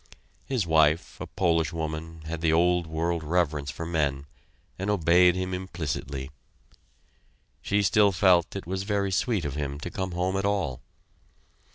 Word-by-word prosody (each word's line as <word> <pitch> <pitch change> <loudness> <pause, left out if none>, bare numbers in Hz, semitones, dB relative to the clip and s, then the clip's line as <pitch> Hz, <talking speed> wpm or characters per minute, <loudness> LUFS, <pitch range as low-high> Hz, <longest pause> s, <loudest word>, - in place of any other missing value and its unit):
His 125 -8 0
wife, 80 0 +2
a - - -5
Polish 85 -4 +1
woman, 80 0 -5
had 80 +1 -5
the 80 -1 +2
old 90 +1 +2
world 80 +1 -2
reverence 75 -3 0
for 75 +5 -5
men, 70 -5 -1 0.5
and 95 +2 -2
obeyed 90 -2 +4
him 95 0 -3
implicitly; 75 -7 -4 1.3
she 100 +1 +1
still 100 +1 +4
felt 90 -2 +3
it 100 - -5
was 95 +2 -3
very 100 -1 -1
sweet 100 -2 0
of 70 - -3
him 70 -1 -4
to 90 - -5
come 95 -2 -4
home 90 +2 -1
at 95 - -1
all. 100 -11 -1
85 Hz, 155 wpm, -27 LUFS, 80-95 Hz, 1.3 s, obeyed